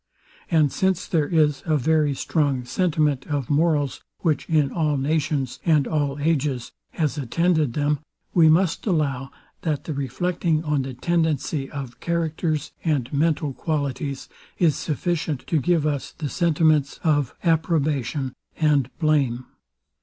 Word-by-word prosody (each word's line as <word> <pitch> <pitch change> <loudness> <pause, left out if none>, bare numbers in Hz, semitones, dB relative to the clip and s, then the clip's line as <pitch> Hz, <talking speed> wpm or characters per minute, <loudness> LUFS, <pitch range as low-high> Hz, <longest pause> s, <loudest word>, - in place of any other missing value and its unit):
And 155 -5 +3
since 190 -2 0
there 155 -4 +1
is 150 -4 +2
a 155 -1 +3
very 150 0 +2
strong 140 -4 0
sentiment 150 -2 0
of 145 -4 -2
morals, 145 -2 +1 0.2
which 160 -4 0
in 150 -4 +2
all 155 -4 0
nations, 140 -2 -1
and 155 -5 +3
all 145 -3 0
ages, 145 -5 0 0.2
has 155 -2 -1
attended 155 0 +1
them, 145 +1 +1 0.3
we 165 -3 +6
must 170 +5 +2
allow, 140 -7 0 0.3
that 155 -4 -1
the 155 - -4
reflecting 155 +4 -1
on 150 -3 +1
the 130 -1 -6
tendency 155 -2 0
of 135 -5 -7
characters 160 -2 -1
and 145 -6 0
mental 150 -1 +1
qualities, 140 -2 -3 0.3
is 165 -5 +3
sufficient 155 -2 -2
to 160 -4 +1
give 170 0 +2
us 145 -3 -2
the 150 -3 -4
sentiments 155 -4 +2
of 145 -5 +1
approbation 150 -5 0 0.2
and 145 -5 +2
blame. 140 -6 +1
150 Hz, 135 wpm, -23 LUFS, 140-160 Hz, 0.3 s, we